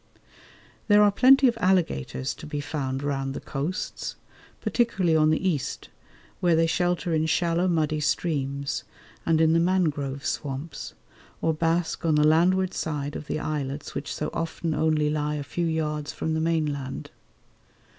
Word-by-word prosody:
There 210 -1 +6
are 205 - +5
plenty 265 +5 +6
of 235 -2 0
alligators 160 - +1
to - - -10
be 150 -1 -3
found 140 -2 -3
round 135 -1 -2
the - - -3
coasts, 150 +6 -4 0.4
particularly 190 -9 +1
on 155 -1 +4
the 155 +4 +1
east, 150 -8 -2 0.5
where 175 -2 +3
they 165 +1 +4
shelter 175 0 0
in 160 0 +1
shallow 170 +2 +1
muddy 155 -3 +1
streams 140 -3 -1 0.4
and 165 -1 +3
in 160 0 +4
the 165 - +4
mangrove 150 -6 0
swamps, 140 +3 -4 0.4
or 160 - +1
bask 165 +2 0
on 160 -2 +2
the 150 0 +4
landward 180 +4 +3
side 145 -2 -3
of 150 - -6
the - - -2
islets 145 -2 -4
which 145 - -4
so - - -3
often 165 0 -2
only 155 -1 +2
lie 150 0 -1
a 145 - -3
few 165 +6 -2
yards 150 -2 -2
from 160 - -3
the 160 - 0
mainland. 150 -5 -2
155 Hz, 155 wpm, -26 LUFS, 145-170 Hz, 0.5 s, There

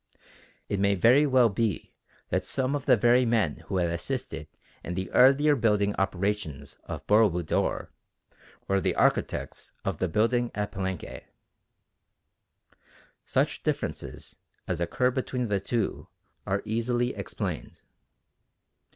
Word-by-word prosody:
It 100 - -2
may 100 0 +3
very 125 +10 +5
well 130 -3 +5
be 110 -2 -2 0.4
that - - 0
some 130 0 -1
of 145 -1 -3
the - - +6
very 120 +3 +4
men 110 -10 +1
who 95 - -1
had 85 -2 +1
assisted 85 - -4 0.4
in 90 - -4
the 95 0 -4
earlier 140 +3 +5
building 105 -4 +2
operations 95 -7 -2
of - - -7
Boro 105 +1 +5
Budor 85 -2 -1 0.8
were 95 0 +2
the - - 0
architects - - 0
of 95 -5 -2
the 95 - +1
building 120 +6 +1
at 105 0 -2
Palenque. 95 -3 -5 2.0
Such - - 0
differences - - -4 0.3
as 85 -1 -2
occur 125 +9 +1
between 125 -2 -2
the 100 -1 +1
two 115 +4 -2 0.4
are 100 +1 0
easily 120 +3 0
explained. - - -5
105 Hz, 125 wpm, -27 LUFS, 95-120 Hz, 2.0 s, the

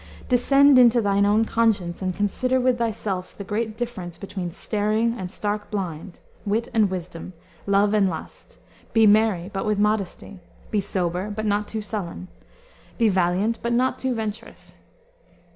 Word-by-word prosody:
"Descend 275 +2 +5
into 240 -1 +6
thine 200 -2 +2
own 215 +2 +3
conscience 205 -7 0
and 185 -1 -2
consider 255 +6 0
with 250 -1 +1
thyself 210 -5 -3
the 200 - -6
great 215 +2 -3
difference 210 -8 -5
between 190 -3 -5
staring 215 +5 0
and 185 -6 -5
stark 210 +1 -3
blind, 180 -3 -5 0.2
wit 220 +3 -1
and 215 -3 +3
wisdom, 180 -1 -6 0.3
love 200 +1 +3
and 200 -3 +3
lust; 160 - -9 0.4
be 225 -1 +5
merry, 210 -3 +3
but 195 - -2
with 210 -1 0
modesty; 205 -2 -1 0.3
be 210 - +1
sober, 185 0 -2
but 215 +1 -4
not 205 0 0
too 220 -1 -4
sullen; 185 -4 -5 0.7
be 230 -2 +3
valiant, 190 +4 +1
but 235 0 -1
not 255 +2 +1
too 260 -2 -1
venturous." 220 0 -6
210 Hz, 155 wpm, -23 LUFS, 190-225 Hz, 0.7 s, into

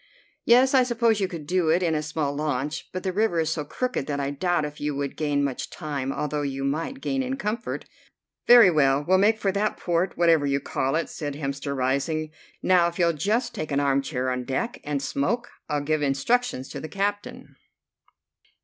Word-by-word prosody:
"Yes, 255 +3 +5
I 265 - +6
suppose 235 -3 +2
you 195 - +1
could 170 -5 -7
do 175 0 +1
it 175 +3 +3
in 165 -2 +1
a 155 - 0
small 150 -2 -2
launch, 150 +1 -2
but 185 - -5
the 185 - -1
river 205 -4 +1
is 160 0 0
so 160 -2 -2
crooked 250 - -3
that 145 -1 -2
I 140 0 -1
doubt 175 +2 0
if 150 0 -8
you 145 -1 -1
would 140 0 -3
gain 145 -2 0
much 140 -2 -3
time, 140 -5 -4
although 150 +1 -2
you 135 -1 -3
might 165 - -2
gain 270 0 -1
in 265 +1 -3
comfort." 225 -1 -3 0.6
"Very 235 -6 +9
well, 140 -2 +3
we'll 185 +1 +4
make 215 +3 +4
for 200 -2 0
that 205 +2 -1
port, 175 +1 -1
whatever 165 -4 +4
you 140 0 +1
call 135 0 -1
it," 165 - 0
said 145 -3 -5
Hemster, 140 -1 -3
rising. 140 +4 -1 0.3
"Now, 180 -2 +4
if 170 - -5
you'll 170 -1 +3
just 225 - 0
take 155 -1 -5
an 140 - +2
armchair 135 -2 0
on 125 0 -2
deck, 140 - -3
and 145 -1 -2
smoke, 195 - -1 0.2
I'll 150 -1 0
give 155 +1 0
instructions 145 - 0
to - - -6
the 155 - -7
captain." 205 +3 -3
155 Hz, 205 wpm, -25 LUFS, 140-195 Hz, 0.6 s, Very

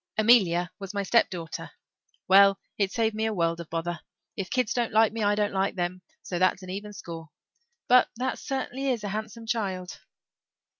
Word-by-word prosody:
Amelia 190 -6 +4
was 195 0 -7
my 200 - 0
step 230 +4 +3
daughter. 170 -3 -6 0.6
Well, 195 +1 +6 0.2
it's 195 -2 -1
saved 225 -1 +1
me 220 +1 -1
a 220 - -1
world 170 -1 0
of 170 - -8
bother. 170 +1 -3 0.4
If 195 -3 -4
kids 250 -3 0
don't 240 -2 0
like 220 0 +4
me 225 - -3
I 205 0 +3
don't 210 -1 0
like 195 +1 0
them, 180 0 -2 0.2
so 175 - -3
that's 185 +1 +2
an 185 - -7
even 205 +2 -6
score. 165 -5 -8 0.6
But 250 0 +6
that 255 +2 -2
certainly 270 0 -3
is 240 -5 -1
a 205 - -3
handsome 215 +2 -5
child." 195 -6 -3
200 Hz, 190 wpm, -27 LUFS, 185-225 Hz, 0.6 s, Well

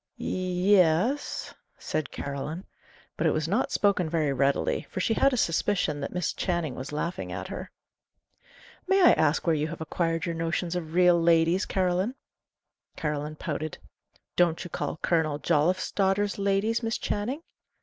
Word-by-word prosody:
"Y 185 +2 0
es," 185 - +1 0.2
said 155 -1 -3
Caroline. 145 +6 -5 0.5
But 165 - +1
it 155 - +3
was 155 0 -1
not 210 +9 0
spoken 195 -5 +2
very 155 -4 +1
readily, 140 +1 0
for - - -5
she 225 - +1
had 275 +4 +3
a 255 - -1
suspicion 170 -5 +1
that 140 - -4
Miss 180 -2 -1
Channing 170 -6 -1
was 130 +3 -7
laughing 150 - -3
at 95 +1 -5
her. 185 0 -6 1.2
"May 385 +1 +4
I 350 - +8
ask 155 0 +2
where 165 - +3
you 150 0 0
have 165 - -7
acquired 165 0 -1
your 170 - -2
notions 165 +1 -2
of 165 -2 -4
'real 180 -1 +5
ladies,' 165 +3 +3
Caroline?" 185 +5 0 0.8
Caroline 150 -1 -3
pouted. 155 -1 -4 0.6
"Don't 170 -1 +2
you 175 - -9
call - - -3
Colonel 160 -4 +1
Jolliffe's 170 +4 +1
daughters 200 +1 +1
ladies, 200 +4 +1
Miss 225 -1 -1
Channing?" 245 +10 -3
170 Hz, 160 wpm, -27 LUFS, 155-190 Hz, 1.2 s, I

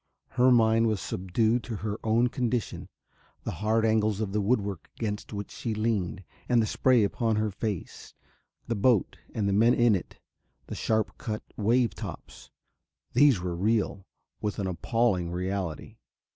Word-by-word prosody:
Her 125 +1 +4
mind 115 -1 +4
was 110 -3 0
subdued 110 +7 0
to 115 - -4
her 105 +1 -4
own 115 +2 +3
condition. 120 -3 -2 0.5
The - - -3
hard 110 +1 +2
angles 110 -2 +2
of 105 -3 -2
the 105 +1 0
woodwork 100 -4 -1
against 105 -2 -3
which 100 -2 -5
she 115 -3 -4
leaned 105 -4 -1 0.3
and 120 -1 +4
the 110 - +3
spray 125 +1 +3
upon 110 +2 0
her 105 0 0
face, 100 -1 -5 0.5
the 115 - -1
boat 115 -1 +2 0.2
and 105 -2 0
the 100 - +1
men 115 +4 +5
in 120 -2 +4
it, 95 - -3 0.5
the - - -7
sharp 110 -1 -1
cut 110 -2 -4
wave 115 +3 +2
tops - - -9 0.6
these 130 -6 +5
were 90 -1 -3
real, 100 0 0 0.3
with 105 -1 -2
an 100 - -2
appalling 95 0 0
reality. 90 -2 -4
110 Hz, 160 wpm, -28 LUFS, 100-115 Hz, 0.6 s, men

